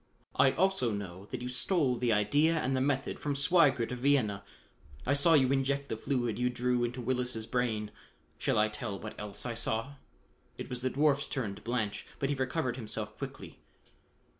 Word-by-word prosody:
I 135 - +5
also 190 -8 +2
know 100 -2 -5
that - - -5
you 125 - -3
stole 130 0 +2
the 120 0 +1
idea 145 +11 +3
and 135 -2 0
the 130 - +1
method 135 0 0
from 145 -1 -2
Sweigert 140 -5 +3
of 125 - -4
Vienna. 120 -7 +2 0.6
I 140 - +2
saw 150 +4 +5
you 130 -3 +4
inject 140 +1 0
the - - -1
fluid 120 -1 -1
you 125 0 +2
drew 125 0 0
into 120 +1 -2
Willis' 125 -2 -1
brain. 110 -4 -1 0.5
Shall - - +1
I 105 0 +4
tell 105 -1 -5
what 105 +2 -7
else 105 +2 -5
I 120 - -2
saw?" 115 +4 -2 0.6
It - - -7
was 125 -1 -3
the 130 - +1
dwarf's 140 +1 +2
turn 115 -8 -2
to - - -12
blanch, 110 -3 -2
but 135 - -1
he 145 - +1
recovered 130 -1 -1
himself 110 -4 -5
quickly. - - -8
125 Hz, 190 wpm, -31 LUFS, 110-140 Hz, 0.6 s, I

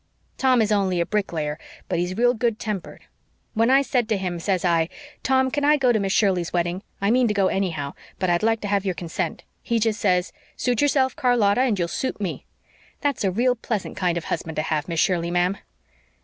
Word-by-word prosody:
Tom 255 -3 +4
is 215 - -1
only 190 -4 +1
a 170 - +2
bricklayer, 165 -7 -2 0.3
but 170 - -1
he's 180 +2 -2
real 245 +1 +4
good 230 -2 0
tempered. 210 -5 -5 0.5
When 225 +1 +2
I 270 +1 +5
said 245 -3 0
to 215 - +2
him, 180 -2 -3
says 185 +1 0
I, 165 -1 +2 0.3
'Tom, 260 0 +2
can 290 +1 -1
I 300 +1 +5
go 255 -3 +3
to 220 - +2
Miss 195 -1 -1
Shirley's 190 -5 +2
wedding? 175 +1 -1 0.2
I 200 +2 +1
mean 250 0 +4
to 210 - -1
go 195 -2 +3
anyhow, 160 -8 -2 0.2
but 185 - -1
I'd 175 -1 +2
like 225 0 +1
to 205 - -3
have 200 -1 +1
your 190 -3 -1
consent,' 170 0 -4 0.2
he 235 - 0
just 225 0 0
says, 180 -2 +1 0.2
'Suit 245 -1 0
yourself, 270 -3 +2
Charlotta, 245 -3 +3
and 245 -6 +2
you'll 175 -2 0
suit 260 +8 -3
me.' 195 -5 -4 0.5
That's 285 -5 0
a 195 - +2
real 240 +7 +2
pleasant 225 -3 -4
kind 175 -2 0
of 170 - -3
husband 160 0 -4
to 155 - 0
have, 155 -1 -1
Miss 165 -2 -2
Shirley, 170 -1 +1
ma'am." 180 +2 +1
200 Hz, 220 wpm, -23 LUFS, 175-240 Hz, 0.5 s, I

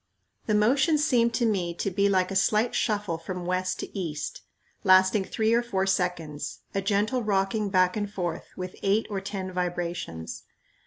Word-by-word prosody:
The 215 - +2
motion 265 +9 +3
seemed 245 -5 +3
to 240 - +1
me 180 -6 0
to 195 - -2
be 200 +2 +2
like 185 -1 +2
a - - -3
slight 215 +4 +2
shuffle 205 -6 0
from 180 +1 -5
west 185 +1 -1
to - - -8
east, 165 -6 -4 0.4
lasting 190 0 +5
three 220 +3 +1
or 235 - +4
four 195 -6 -1
seconds, 180 -6 -2
a 195 - 0
gentle 210 +6 +1
rocking 205 0 0
back 185 -1 +3
and 205 -1 -2
forth, 175 -5 -3
with 185 -1 -5
eight 200 +3 +2
or 195 -1 -2
ten 195 -1 -5
vibrations. 175 - -3
195 Hz, 170 wpm, -27 LUFS, 180-210 Hz, 0.4 s, lasting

